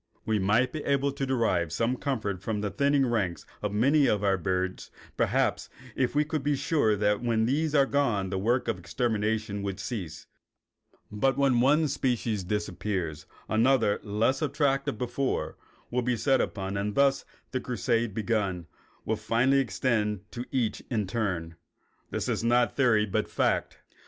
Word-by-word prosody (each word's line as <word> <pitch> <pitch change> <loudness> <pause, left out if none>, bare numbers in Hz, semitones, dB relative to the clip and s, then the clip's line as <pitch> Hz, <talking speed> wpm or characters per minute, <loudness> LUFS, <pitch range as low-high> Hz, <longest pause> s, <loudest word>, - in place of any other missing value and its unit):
We 110 -1 +1
might 110 +7 +2
be 155 - -5
able 140 0 +1
to 135 0 -3
derive 110 - +1
some 115 +8 0
comfort 110 -9 -3
from 105 0 -2
the 105 -1 -2
thinning 140 +5 +2
ranks 105 -8 -1 0.2
of 105 - -2
many 140 +8 +3
of 105 -1 +1
our 100 -1 +3
birds, 95 +1 -2 0.3
perhaps, - - 0 0.3
if 130 +1 0
we 150 +1 +3
could 155 0 -2
be 145 +1 +1
sure 135 -7 +2
that 105 +1 +1
when 115 -2 +1
these 150 +5 0
were 140 -2 +6
gone 115 -10 0
the 95 - -1
work 120 +6 +1
of 110 -5 -1
extermination 110 -1 -1
would 100 0 -4
cease. 95 -10 -5 0.9
But 130 +6 +1
when 135 -3 +3
one 150 +5 +4
species 120 -7 -1
disappears 95 -5 -3 0.2
another, 115 -1 +3
less 110 +7 0
attractive 140 -4 0
before, 125 +3 -2 0.4
will 125 +1 +1
be 125 0 0
set 135 +3 +2
upon, 95 -1 -3
and 100 +1 -2
thus 140 -1 +3 0.3
the 130 - -1
crusade, 120 -1 0
once 100 - -14
begun, 105 -6 -1 0.4
will 110 - 0
finally 120 +6 +2
extend 105 -3 0
to 120 +1 -5
each 120 -5 -1
in 110 -5 0
turn. 90 -6 -3 0.5
This - - -3
is - - -1
not 120 +1 +2
theory 115 -6 +3
but 100 - -1
fact. - - 0
115 Hz, 165 wpm, -28 LUFS, 100-135 Hz, 0.9 s, were